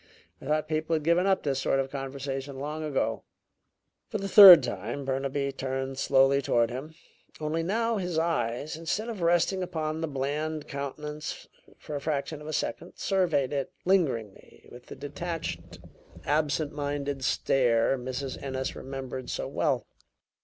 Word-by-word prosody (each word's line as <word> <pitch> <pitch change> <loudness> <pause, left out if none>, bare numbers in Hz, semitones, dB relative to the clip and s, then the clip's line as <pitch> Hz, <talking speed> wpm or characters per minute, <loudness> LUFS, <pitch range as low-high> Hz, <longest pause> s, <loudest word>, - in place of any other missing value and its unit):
I - - -9
thought 155 +1 +1
people 155 +1 0
had 155 - -2
given 170 +4 +3
up 190 -1 +2
this 135 -2 0
sort 135 - +1
of 135 0 -2
conversation 135 0 -5
long 150 +3 -4
ago." 125 -7 -1 0.9
For - - -2
the 195 -1 -4
third 190 -7 +11
time 120 +5 -4
Burnaby 135 +1 -1
turned 135 0 -4
slowly 135 0 +4
toward 120 -2 +2
him, 145 +6 -7 0.4
only 155 +2 -1
now 225 +6 0
his 180 -4 -2
eyes, 145 -3 -1
instead 165 +8 -2
of 215 -5 -5
resting 175 +3 +2
upon 160 -3 -3
the 165 - -1
bland 150 +2 -3
countenance 150 +2 -6 0.3
for 150 - -7
a 140 - -3
fraction 150 0 -2
of 150 - -9
a - - -4
second, 170 +3 -3
surveyed 165 -9 +1
it 140 -2 -2
lingeringly 125 - -1
with 120 0 -13
the - - -8
detached, 145 - -5 0.5
absent 150 0 +1
minded 145 -2 -3
stare 120 -2 +2
Mrs. 130 +1 -5
Ennis 130 -1 -3
remembered 130 -1 -6
so - - -3
well. - - 0
145 Hz, 155 wpm, -28 LUFS, 135-160 Hz, 0.9 s, third